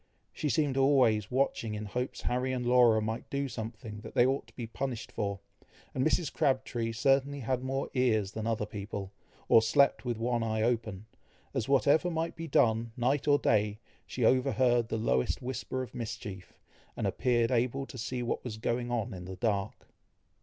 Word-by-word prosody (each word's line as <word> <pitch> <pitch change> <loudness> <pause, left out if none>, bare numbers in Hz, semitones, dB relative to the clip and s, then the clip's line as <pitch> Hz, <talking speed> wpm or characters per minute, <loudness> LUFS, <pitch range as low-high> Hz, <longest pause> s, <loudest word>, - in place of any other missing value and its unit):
She 150 - -2
seemed 145 -3 +1
always 130 -7 +4
watching 125 -4 0
in 105 0 -5
hopes 125 +5 -4
Harry 125 +1 -1
and 125 -1 -2
Laura 120 -3 +5
might 110 +2 -4
do 140 0 -1
something 110 -2 -7
that - - -10
they 120 - +6
ought 135 -2 0
to 115 - -21
be 120 - -5
punished 120 0 -4
for; 100 -1 -3 0.5
and 130 - 0
Mrs. 155 +1 +1
Crabtree 125 -4 0
certainly 135 +4 +1
had 125 +1 -1
more 135 +1 -2
ears 110 -7 +2
than 110 +1 -4
other 110 -2 0
people, 100 -2 -6 0.4
or 115 - +7
slept 110 +5 +3
with 120 -3 -2
one 120 +1 0
eye 110 -1 0
open, 110 -4 -1 0.5
as, 115 - -2
whatever 145 +5 +4
might 165 0 -2
be 165 0 -6
done, 115 -4 +2
night 130 +4 +1
or 145 -1 +6
day, 105 -5 +1 0.3
she 125 - -1
overheard 125 -2 +3
the - - -1
lowest 65 - +1
whisper 130 0 -4
of 125 - -10
mischief, 110 -5 -7 0.4
and - - -2
appeared 120 -2 +1
able 125 +3 +1
to 130 - -10
see 125 +1 -3
what 120 - -2
was 110 -4 -5
going 120 +2 -1
on 120 -1 -2
in 90 -1 -8
the 95 +1 -7
dark. 100 -1 -2
120 Hz, 180 wpm, -30 LUFS, 110-130 Hz, 0.5 s, or